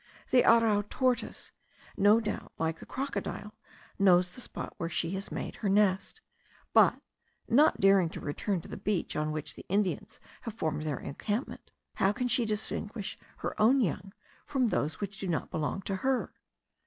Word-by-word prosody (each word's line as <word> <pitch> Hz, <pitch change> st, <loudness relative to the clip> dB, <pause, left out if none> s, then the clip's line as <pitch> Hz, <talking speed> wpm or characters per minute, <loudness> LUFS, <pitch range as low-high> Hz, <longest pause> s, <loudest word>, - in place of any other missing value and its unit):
The 255 Hz, -, +6 dB
arrau 225 Hz, -3 st, +5 dB
tortoise, 255 Hz, -2 st, -1 dB, 0.4 s
no 205 Hz, +3 st, +5 dB
doubt, 215 Hz, -2 st, -4 dB
like 160 Hz, 0 st, -1 dB
the -, -, -11 dB
crocodile, 260 Hz, -5 st, -4 dB, 0.5 s
knows 180 Hz, -2 st, +5 dB
the 250 Hz, -, -8 dB
spot -, -, -6 dB
where 165 Hz, -3 st, -3 dB
she 165 Hz, 0 st, -1 dB
has 195 Hz, +1 st, -4 dB
made -, -, -5 dB
her 205 Hz, -, -1 dB
nest; 200 Hz, -, +2 dB, 0.5 s
but, -, -, +6 dB, 0.5 s
not 295 Hz, +7 st, +4 dB
daring 195 Hz, -3 st, +5 dB
to -, -, -7 dB
return 175 Hz, +5 st, -2 dB
to -, -, -12 dB
the -, -, -7 dB
beach 205 Hz, -4 st, -1 dB
on 155 Hz, 0 st, 0 dB
which 155 Hz, -1 st, -3 dB
the -, -, -12 dB
Indians 195 Hz, 0 st, -1 dB, 0.2 s
have 230 Hz, -3 st, -6 dB
formed 155 Hz, -7 st, -1 dB
their 145 Hz, -4 st, -1 dB
encampment, 210 Hz, -, -4 dB, 0.3 s
how 195 Hz, -, +3 dB
can 250 Hz, +3 st, -1 dB
she 240 Hz, 0 st, +2 dB
distinguish 210 Hz, -1 st, -3 dB, 0.3 s
her -, -, -1 dB
own 250 Hz, +6 st, +6 dB
young 195 Hz, -, -1 dB, 0.4 s
from 255 Hz, -4 st, +1 dB
those 150 Hz, -6 st, -1 dB
which 200 Hz, 0 st, -5 dB
do 195 Hz, -, -3 dB
not 170 Hz, -3 st, -2 dB
belong 160 Hz, +5 st, -2 dB
to 195 Hz, -, -2 dB
her? 260 Hz, +4 st, 0 dB
200 Hz, 170 wpm, -30 LUFS, 175-230 Hz, 0.5 s, The